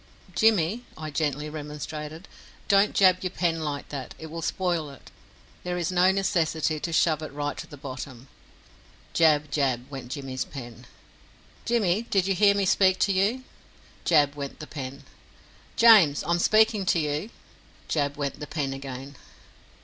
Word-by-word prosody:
"Jimmy," 215 Hz, +2 st, +2 dB
I 155 Hz, -1 st, -6 dB
gently 150 Hz, 0 st, -1 dB
remonstrated, 150 Hz, +2 st, -7 dB, 0.4 s
"don't 200 Hz, +1 st, +4 dB
jab 185 Hz, -2 st, +5 dB
your 185 Hz, -, -2 dB
pen 170 Hz, -2 st, -1 dB
like 145 Hz, -2 st, -4 dB
that 135 Hz, -3 st, -6 dB
it 160 Hz, -1 st, -9 dB
will 165 Hz, 0 st, -5 dB
spoil 170 Hz, -3 st, -1 dB
it. 140 Hz, -, -14 dB, 0.5 s
There 180 Hz, 0 st, -3 dB
is 175 Hz, +1 st, -1 dB
no 180 Hz, +1 st, +4 dB
necessity 165 Hz, -5 st, 0 dB
to 165 Hz, -, -4 dB
shove 160 Hz, -2 st, +2 dB
it 155 Hz, -, -6 dB
right 145 Hz, +1 st, -3 dB
to -, -, -7 dB
the 145 Hz, -, -11 dB
bottom." 130 Hz, -1 st, -8 dB, 0.9 s
Jab, 150 Hz, -3 st, +3 dB
jab, 130 Hz, -4 st, 0 dB
went 130 Hz, -3 st, -7 dB
Jimmy's 135 Hz, -3 st, -4 dB
pen. 120 Hz, -2 st, -10 dB, 0.8 s
"Jimmy, 215 Hz, -4 st, +2 dB
did 195 Hz, -5 st, 0 dB
you 195 Hz, -, +1 dB
hear 200 Hz, +2 st, +4 dB
me 200 Hz, -1 st, +1 dB
speak 190 Hz, 0 st, +4 dB
to 200 Hz, -, +2 dB
you?" 205 Hz, +7 st, +1 dB, 0.6 s
Jab 145 Hz, -4 st, +4 dB
went 140 Hz, -1 st, -6 dB
the 155 Hz, -, -7 dB
pen. 140 Hz, -2 st, -7 dB, 0.7 s
"James, 210 Hz, -11 st, +6 dB
I 170 Hz, -, -2 dB
am 175 Hz, -, +2 dB
speaking 215 Hz, +1 st, +4 dB
to -, -, +3 dB
you!" 150 Hz, +6 st, -2 dB, 0.6 s
Jab 145 Hz, -2 st, -1 dB
went 140 Hz, -2 st, -3 dB
the 150 Hz, -, -6 dB
pen 140 Hz, -3 st, -2 dB
again. 135 Hz, 0 st, -8 dB
155 Hz, 160 wpm, -26 LUFS, 145-185 Hz, 0.9 s, James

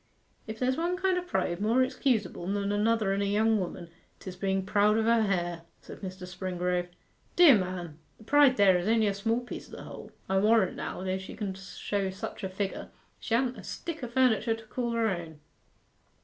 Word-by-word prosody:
'If 220 Hz, 0 st, -6 dB
there's 255 Hz, +2 st, 0 dB
one 345 Hz, +2 st, 0 dB
kind 380 Hz, 0 st, +1 dB
of 360 Hz, -, -9 dB
pride 175 Hz, -, -1 dB
more 230 Hz, +5 st, +3 dB
excusable 235 Hz, -9 st, -1 dB
than 200 Hz, +1 st, -1 dB
another 210 Hz, -1 st, +1 dB
in 200 Hz, -, -1 dB
a -, -, +1 dB
young 215 Hz, +2 st, +2 dB
woman, 175 Hz, -2 st, -5 dB, 0.3 s
'tis 185 Hz, -1 st, -8 dB
being 190 Hz, 0 st, -1 dB
proud 210 Hz, +1 st, +3 dB
of 220 Hz, -, +1 dB
her 230 Hz, 0 st, +4 dB
hair,' 175 Hz, -5 st, -1 dB, 0.2 s
said -, -, -11 dB
Mr. 185 Hz, -1 st, -7 dB
Springrove. 180 Hz, -1 st, -2 dB, 0.5 s
'Dear 340 Hz, -7 st, +8 dB
man! 175 Hz, -4 st, -5 dB, 0.2 s
the -, -, -16 dB
pride 280 Hz, +1 st, +5 dB
there 190 Hz, -3 st, +5 dB
is 175 Hz, -, -3 dB
only 225 Hz, 0 st, +3 dB
a 200 Hz, -, +1 dB
small 225 Hz, +4 st, 0 dB
piece 245 Hz, -, -9 dB
o' -, -, -9 dB
the -, -, -9 dB
whole. -, -, -10 dB, 0.2 s
I 190 Hz, 0 st, +2 dB
warrant 215 Hz, -2 st, +3 dB
now, -, -, -5 dB
though 190 Hz, 0 st, -1 dB
she 190 Hz, -, -9 dB
can 200 Hz, -3 st, -3 dB
show 195 Hz, +1 st, -3 dB
such 190 Hz, +2 st, -7 dB
a 190 Hz, -, -2 dB
figure, 190 Hz, +1 st, -4 dB, 0.3 s
she 230 Hz, -, -1 dB
ha'n't 250 Hz, +1 st, 0 dB
a -, -, -10 dB
stick 325 Hz, -5 st, -6 dB
o' -, -, -2 dB
furniture 235 Hz, -2 st, +2 dB
to 225 Hz, -, -12 dB
call 235 Hz, +2 st, -3 dB
her 230 Hz, -1 st, +1 dB
own. 170 Hz, -6 st, -4 dB
205 Hz, 205 wpm, -29 LUFS, 185-230 Hz, 0.5 s, Dear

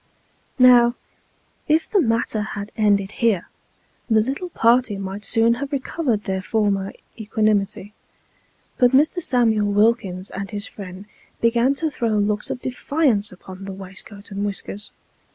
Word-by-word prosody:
Now, 245 Hz, -2 st, +6 dB, 0.7 s
if 315 Hz, +1 st, +2 dB
the 405 Hz, -4 st, +2 dB
matter 225 Hz, -3 st, 0 dB
had 205 Hz, -1 st, -5 dB
ended 200 Hz, -2 st, +2 dB
here, 220 Hz, -7 st, 0 dB, 0.6 s
the 220 Hz, -1 st, +4 dB
little 270 Hz, +11 st, -2 dB
party 235 Hz, -, +2 dB
might 195 Hz, +1 st, -6 dB
soon 230 Hz, 0 st, +3 dB
have 280 Hz, 0 st, -4 dB
recovered 265 Hz, -5 st, -1 dB
their 190 Hz, -1 st, -2 dB
former 200 Hz, -1 st, 0 dB, 0.3 s
equanimity; 210 Hz, -1 st, 0 dB, 0.9 s
but 245 Hz, 0 st, +4 dB
Mr. 310 Hz, +6 st, +3 dB
Samuel 225 Hz, -7 st, +2 dB
Wilkins 200 Hz, -3 st, +1 dB
and 195 Hz, 0 st, -5 dB
his 205 Hz, 0 st, -3 dB
friend 195 Hz, -2 st, -9 dB, 0.3 s
began 235 Hz, +4 st, +2 dB
to 315 Hz, +2 st, -2 dB
throw 230 Hz, -6 st, 0 dB
looks 210 Hz, 0 st, 0 dB
of 250 Hz, -, -4 dB
defiance 255 Hz, -4 st, 0 dB
upon 185 Hz, +1 st, -11 dB
the 195 Hz, -, -6 dB
waistcoat 195 Hz, +2 st, -8 dB
and 200 Hz, +1 st, -3 dB
whiskers. 205 Hz, 0 st, -4 dB
215 Hz, 135 wpm, -22 LUFS, 200-245 Hz, 0.9 s, Now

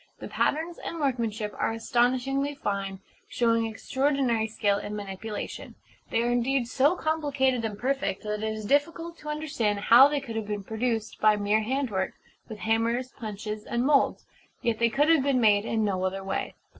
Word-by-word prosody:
The -, -, -7 dB
patterns 330 Hz, +3 st, -1 dB
and 335 Hz, -, -6 dB
workmanship 230 Hz, -7 st, -1 dB
are -, -, +1 dB
astonishingly 255 Hz, +5 st, 0 dB
fine, 195 Hz, -5 st, -3 dB, 0.3 s
showing 230 Hz, -1 st, +1 dB
extraordinary 260 Hz, -1 st, 0 dB
skill 205 Hz, -2 st, 0 dB
in 210 Hz, -, -5 dB
manipulation: 205 Hz, +1 st, -6 dB, 0.3 s
they 230 Hz, -, +1 dB
are 240 Hz, -, +1 dB
indeed 245 Hz, +1 st, +1 dB
so 280 Hz, +7 st, +3 dB
complicated 285 Hz, -7 st, 0 dB
and 215 Hz, -2 st, -3 dB
perfect 270 Hz, -3 st, -1 dB
that 210 Hz, 0 st, -3 dB
it 220 Hz, 0 st, -1 dB
is 215 Hz, -1 st, -5 dB
difficult 330 Hz, +6 st, 0 dB
to 300 Hz, -, -8 dB
understand 275 Hz, -9 st, -1 dB
how 240 Hz, +6 st, +8 dB
they 290 Hz, 0 st, -1 dB
could 235 Hz, -5 st, -7 dB
have 220 Hz, -2 st, -3 dB
been 205 Hz, -1 st, -3 dB
produced 225 Hz, +1 st, -2 dB
by 215 Hz, -1 st, +5 dB
mere 210 Hz, +1 st, +1 dB
handwork, 225 Hz, -5 st, -1 dB, 0.4 s
with 220 Hz, -, -7 dB
hammers, 230 Hz, +4 st, 0 dB
punches, 210 Hz, -1 st, -6 dB
and 240 Hz, +3 st, -1 dB
moulds. 280 Hz, -1 st, +2 dB, 0.4 s
Yet 230 Hz, -2 st, 0 dB
they 235 Hz, 0 st, +3 dB
could 285 Hz, +6 st, +2 dB
have 325 Hz, -3 st, +5 dB
been 270 Hz, -1 st, +2 dB
made 210 Hz, -2 st, +4 dB
in 220 Hz, -2 st, 0 dB
no 190 Hz, -2 st, -1 dB
other 190 Hz, +1 st, -2 dB
way. 195 Hz, -, -3 dB
230 Hz, 175 wpm, -27 LUFS, 210-275 Hz, 0.4 s, how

